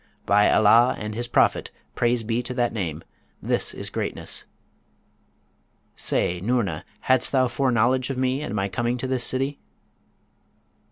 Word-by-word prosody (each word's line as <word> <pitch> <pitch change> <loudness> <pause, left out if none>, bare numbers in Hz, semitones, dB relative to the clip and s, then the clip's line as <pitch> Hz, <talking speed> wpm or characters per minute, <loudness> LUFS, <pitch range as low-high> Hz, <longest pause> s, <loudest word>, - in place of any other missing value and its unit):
By 105 +1 +4
Allah 115 +3 +5
and 105 0 -5
his 120 +2 -3
Prophet - - +2 0.2
(praise 120 -1 +1
be 115 +2 -1
to 125 +1 -6
that 120 -2 0
name!), 85 -7 -4 0.4
this - - +1
is - - -6
greatness! - - -3 1.5
Say, 90 0 0
Noorna, 100 -7 -1 0.2
hadst 130 -1 +2
thou 130 -2 +3
foreknowledge 125 0 +1
of 135 - -3
me 130 +2 0
and 150 - -4
my 100 -1 0
coming 120 +5 -2
to 125 - -4
this 130 -2 -1
city?' 135 +3 0
120 Hz, 145 wpm, -24 LUFS, 105-130 Hz, 1.5 s, Allah